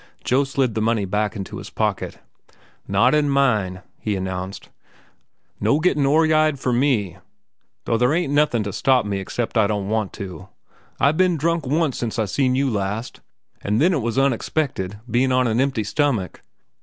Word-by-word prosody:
Joe 135 Hz, +3 st, +2 dB
slid 135 Hz, -3 st, 0 dB
the 110 Hz, -, -1 dB
money 110 Hz, -2 st, +1 dB
back 105 Hz, +3 st, -1 dB
into 95 Hz, -3 st, -6 dB
his -, -, -9 dB
pocket. -, -, -2 dB, 0.7 s
"Not 100 Hz, +7 st, +3 dB
in 150 Hz, -1 st, +2 dB
mine," 105 Hz, -10 st, +1 dB, 0.2 s
he 105 Hz, -2 st, -2 dB
announced. 95 Hz, 0 st, -5 dB, 0.9 s
"No 145 Hz, -, +2 dB
gettin' 150 Hz, -4 st, +2 dB
oryide 155 Hz, 0 st, +3 dB
for 125 Hz, -2 st, -1 dB
me, 120 Hz, -8 st, +1 dB, 0.7 s
though 115 Hz, -, +1 dB
there 125 Hz, +2 st, +3 dB
ain't 160 Hz, -3 st, 0 dB
nothin' 145 Hz, -6 st, +2 dB
to 100 Hz, -1 st, -5 dB
stop 130 Hz, -1 st, +2 dB
me 100 Hz, -1 st, -2 dB
except 115 Hz, +4 st, -2 dB
I 105 Hz, -, +4 dB
don't 100 Hz, -1 st, -2 dB
want 110 Hz, -2 st, -1 dB
to. 95 Hz, -5 st, -8 dB, 0.5 s
I've 150 Hz, +3 st, +3 dB
ben 185 Hz, -2 st, +3 dB
drunk 165 Hz, -1 st, 0 dB
once 150 Hz, 0 st, 0 dB
since 115 Hz, -1 st, -3 dB
I 110 Hz, -, +1 dB
seen 130 Hz, +5 st, +1 dB
you 135 Hz, +1 st, +1 dB
last, 105 Hz, 0 st, -3 dB, 0.4 s
an' 105 Hz, +1 st, 0 dB
then 170 Hz, +9 st, +3 dB
it 145 Hz, -, 0 dB
was 115 Hz, +2 st, -2 dB
unexpected, 135 Hz, -6 st, 0 dB
bein' 125 Hz, +3 st, +1 dB
on 130 Hz, 0 st, +3 dB
an 115 Hz, +1 st, +1 dB
empty 135 Hz, -5 st, 0 dB
stomach. 110 Hz, -, -1 dB
120 Hz, 175 wpm, -22 LUFS, 105-140 Hz, 0.9 s, I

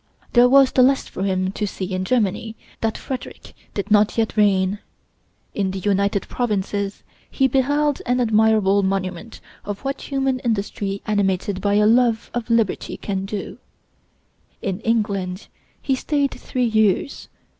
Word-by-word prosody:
There 245 Hz, 0 st, +6 dB
was 270 Hz, 0 st, +6 dB
the 255 Hz, -, +3 dB
less 265 Hz, +1 st, +3 dB
for -, -, -7 dB
him 190 Hz, -1 st, 0 dB
to 210 Hz, +1 st, -3 dB
see 190 Hz, -1 st, -5 dB
in 185 Hz, 0 st, -2 dB
Germany 220 Hz, -1 st, 0 dB, 0.2 s
that 225 Hz, -1 st, -1 dB
Frederick 260 Hz, -2 st, -7 dB, 0.2 s
did 200 Hz, +1 st, -4 dB
not 210 Hz, +1 st, +4 dB
yet 225 Hz, -2 st, 0 dB
reign. 200 Hz, -2 st, +2 dB, 0.7 s
In 195 Hz, -2 st, -1 dB
the 190 Hz, -, -4 dB
United 200 Hz, 0 st, 0 dB
Provinces 205 Hz, -3 st, -2 dB, 0.3 s
he 270 Hz, -, +2 dB
beheld 285 Hz, +3 st, +1 dB
an 250 Hz, +1 st, +2 dB
admirable 215 Hz, -3 st, +3 dB
monument 190 Hz, +2 st, -3 dB, 0.2 s
of 205 Hz, -1 st, -5 dB
what 275 Hz, +1 st, -3 dB
human 270 Hz, -2 st, -1 dB
industry 200 Hz, -4 st, -2 dB
animated 195 Hz, -2 st, 0 dB
by 205 Hz, +1 st, +1 dB
a 210 Hz, 0 st, +4 dB
love 235 Hz, 0 st, +3 dB
of 240 Hz, -1 st, -4 dB
liberty 230 Hz, -4 st, 0 dB
can 195 Hz, -1 st, -3 dB
do. 200 Hz, 0 st, -6 dB, 1.0 s
In 195 Hz, -1 st, -3 dB
England 200 Hz, -5 st, -1 dB, 0.3 s
he 270 Hz, -, +1 dB
stayed 280 Hz, +1 st, 0 dB
three 250 Hz, -1 st, -2 dB
years. 220 Hz, +3 st, +1 dB
210 Hz, 145 wpm, -21 LUFS, 195-245 Hz, 1.0 s, There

